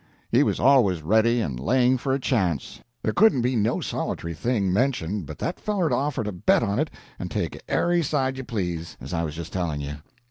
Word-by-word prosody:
He - - +5
was - - +1
always 115 - +4
ready 110 +6 +3
and 65 - -3
laying 125 - +3
for 135 +2 -2
a 135 - +1
chance; 95 - -1 0.2
there 110 - 0
couldn't 190 - +4
be 125 +1 +1
no 110 0 +1
solit'ry 85 0 -3
thing 100 0 0
mentioned 105 - 0
but 75 - -8
that 175 - -3
feller'd 195 -7 0
offer 140 -4 0
to 105 - -3
bet 90 -2 +2
on 100 +4 0
it, 155 - 0 0.3
and - - -4
take - - -3
ary 175 0 +2
side 135 -3 0
you 130 - -5
please, 90 -8 -4
as 65 +6 -7
I 85 - 0
was 80 -2 -3
just 85 0 -7
telling 85 -5 -1
you. 70 0 -5
110 Hz, 210 wpm, -25 LUFS, 85-130 Hz, 0.3 s, He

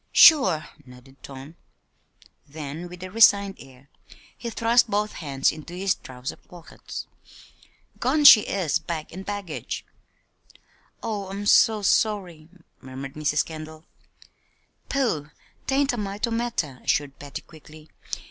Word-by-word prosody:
"Sure!" 265 - +6 0.2
nodded 125 +1 -17
Tom. 135 +4 -10 0.9
Then, 155 +3 -7
with 180 +1 -10
a 185 - -7
resigned 200 -2 +5
air, 135 0 -16 0.5
he 235 - -6
thrust 230 +1 +3
both 210 +1 0
hands 140 -4 0
into 155 +3 -10
his 190 +1 +1
trousers 125 0 -8
pockets. 175 -2 -9 0.9
"Gone 285 +5 +1
she 225 -6 +11
is, 175 -7 -1
bag 160 -1 -6
and 190 +3 -7
baggage." 200 -5 -5 1.2
"Oh, 210 -4 -3
I'm 200 +1 -5
so 215 0 +5
sorry," 185 -6 0 0.3
murmured 135 +1 -8
Mrs. 150 -1 0
Kendall. 155 0 -9 1.0
"Pooh! 220 - -1 0.4
'tain't 275 0 +2
a - - -3
mite 205 +1 -2
o' 235 - -5
matter," 225 - -2
assured 145 -2 -1
Patty, 145 -1 -8
quickly. 155 0 -16
170 Hz, 125 wpm, -24 LUFS, 150-210 Hz, 1.2 s, she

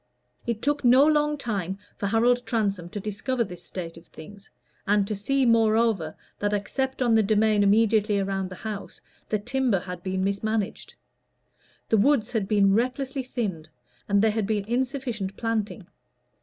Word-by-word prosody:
It 230 -2 -2
took 290 0 0
no 255 +3 +6
long 300 -1 +2
time 195 -8 -3 0.2
for 200 - -3
Harold 240 +4 +3
Transome 200 -6 -1
to 205 - -5
discover 220 +5 -2
this 180 -5 -9
state 170 -3 -7
of 165 - -15
things, 200 +4 -13 0.4
and 205 0 +3
to 210 +1 -3
see, 265 +7 +1
moreover, 225 -7 +2 0.2
that, 205 0 0
except 260 +6 -1
on 235 -2 +3
the 220 - +5
demesne 215 0 +3
immediately 210 0 +3
around 195 -1 -1
the 185 - -8
house, 210 +1 -7 0.3
the 215 - +1
timber 245 0 0
had 180 -1 -7
been 185 0 -2
mismanaged. 200 +1 -2 0.9
The 220 - +4
woods 255 +2 +3
had 220 -5 -1
been 200 -2 +4
recklessly 260 +4 -1
thinned, 205 -11 -4 0.4
and 200 0 +3
there 220 - +4
had 215 -2 -1
been 210 -2 -1
insufficient 240 -4 -2
planting. 220 -3 -2
215 Hz, 160 wpm, -26 LUFS, 195-240 Hz, 0.9 s, no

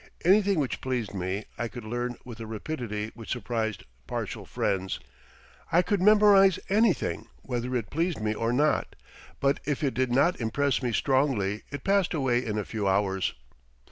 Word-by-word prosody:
Anything 200 +1 +5
which 140 -4 -1
pleased 125 -6 -2
me 95 +2 -3
I 120 - -1
could 120 0 -9
learn 120 +2 -3
with 120 -2 -9
a 115 - -6
rapidity 110 -2 -4
which 115 -2 -11
surprised 115 -5 -2 0.2
partial - - -4
friends. 95 -1 -1 0.7
I 175 +2 +5
could 200 +1 0
memorize 200 -2 +6
anything 210 -1 +1 0.2
whether 125 0 -3
it 115 -4 -2
pleased 165 0 0
me 110 0 0
or 115 +2 -1
not, 145 +5 +1 0.4
but 140 0 +2
if 145 0 -2
it 135 - +1
did 130 +1 0
not 140 +5 +3
impress 135 +6 +1
me 125 -2 -1
strongly 125 -7 +1
it 145 -2 -6
passed 195 -3 +2
away 130 -4 +1
in 110 -3 -3
a 105 - -2
few 105 -3 -2
hours. 95 -1 +1
125 Hz, 170 wpm, -27 LUFS, 110-155 Hz, 0.7 s, memorize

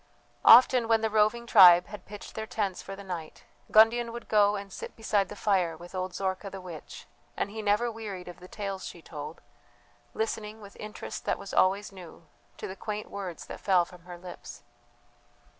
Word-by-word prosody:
Often 245 0 +8
when 225 -1 +3
the 220 -1 0
roving 220 +2 +2
tribe 180 -6 +8
had 210 -3 -11
pitched 205 0 -10
their 220 0 -5
tents 200 -5 -2
for 195 - -8
the 200 - -10
night, 170 -5 -7 0.3
Gundian 230 +2 +5
would 235 +1 -8
go 205 -1 +4
and 200 -1 -7
sit - - -8
beside 205 -4 0
the - - -8
fire 180 -6 +1
with 175 +2 -12
old 185 -1 -3
Zorka 190 +1 -3
the 195 - -8
witch, 175 -5 -10 0.3
and 200 - -2
he 220 +1 -5
never 210 +3 +1
wearied 205 -5 -7
of 175 -1 -10
the 180 - -12
tales 195 -1 -5
she 170 - -9
told, 150 0 -8 0.7
listening, 220 -1 -3
with 200 -2 -13
interest 210 0 -7
that - - 0
was 200 -1 -9
always 195 +3 +2
new, 175 -3 -13 0.3
to - - -6
the 190 - -7
quaint 210 +1 -6
words 185 -5 -6
that - - -8
fell 185 -3 +3
from 175 0 -16
her 175 -1 -9
lips. 180 0 -10
200 Hz, 190 wpm, -28 LUFS, 180-215 Hz, 0.7 s, Often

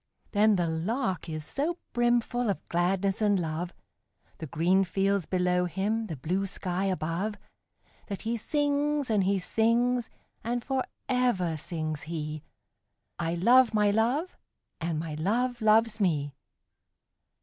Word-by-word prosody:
But 210 0 +4
the 175 - +1
Lark 185 +4 -2
is 155 -1 -4
so 315 - -2 0.2
brimful 240 0 +1
of 195 - -3
gladness 190 +3 +1
and 205 -2 +3
love, 170 +1 -3 0.7
The 160 - -5
green 180 +7 +3
fields 195 0 0
below 180 -1 +1
him, 205 +6 -1
the 165 - -4
blue 180 +8 -1
sky 185 0 -2
above, 185 +3 -1 0.7
That 200 -2 -5
he 230 +1 -1
sings, 290 +1 0
and 200 -3 +3
he 200 +1 +2
sings; 230 +5 +1 0.3
and 240 +1 -2
for 265 0 0 0.2
ever 240 -10 +1
sings 155 -1 -4
he 155 -2 -4 0.8
'I 170 0 -1
love 235 +6 +5
my 210 -1 +4
Love, 245 - +1 0.4
and 165 -1 -2
my 155 0 -4
Love 235 +10 0
loves 220 +1 +4
me!' 150 -7 +1
195 Hz, 135 wpm, -28 LUFS, 170-235 Hz, 0.8 s, love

